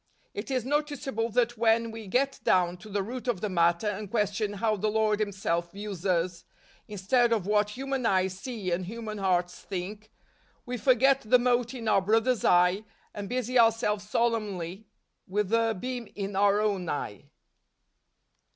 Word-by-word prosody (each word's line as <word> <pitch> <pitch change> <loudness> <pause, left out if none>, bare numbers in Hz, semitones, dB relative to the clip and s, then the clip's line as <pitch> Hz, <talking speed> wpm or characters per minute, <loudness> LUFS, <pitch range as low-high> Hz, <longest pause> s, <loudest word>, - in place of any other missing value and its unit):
It 205 - -6
is 255 -3 -1
noticeable 275 -5 -1
that 240 0 0
when 230 0 +3
we 225 -2 -8
get 270 +7 0
down 180 -1 +2
to 215 +4 -13
the 200 -1 -1
root 250 +5 -6
of 235 -7 0
the 210 - -2
matter 170 +1 +2
and 210 0 -3
question 210 -1 0
how 215 +1 0
the 215 +2 -1
Lord 215 -1 +1
Himself 185 -5 -1
views 200 -2 -5
us, 175 -1 0 0.4
instead 225 +4 +1
of 215 -5 +1
what 210 +1 +1
human 270 -1 -2
eyes 185 -1 +1
see 205 -2 -5
and 175 +1 -1
human 215 0 -6
hearts 180 -2 0
think, 205 +3 -6 0.5
we 250 -1 -4
forget 265 +4 +4
the 235 +3 +4
mote 245 0 +1
in 230 -3 -6
our 195 - +4
brother's 225 +3 +2
eye 180 +3 +4 0.3
and 205 -1 -6
busy 250 0 0
ourselves 220 -3 +2
solemnly 210 -5 -1 0.4
with 205 +1 -1
the 225 -1 +2
beam 250 -1 -4
in 200 -1 -4
our 200 +1 +4
own 200 -5 0
eye. 105 -8 -5
210 Hz, 165 wpm, -28 LUFS, 190-235 Hz, 0.5 s, forget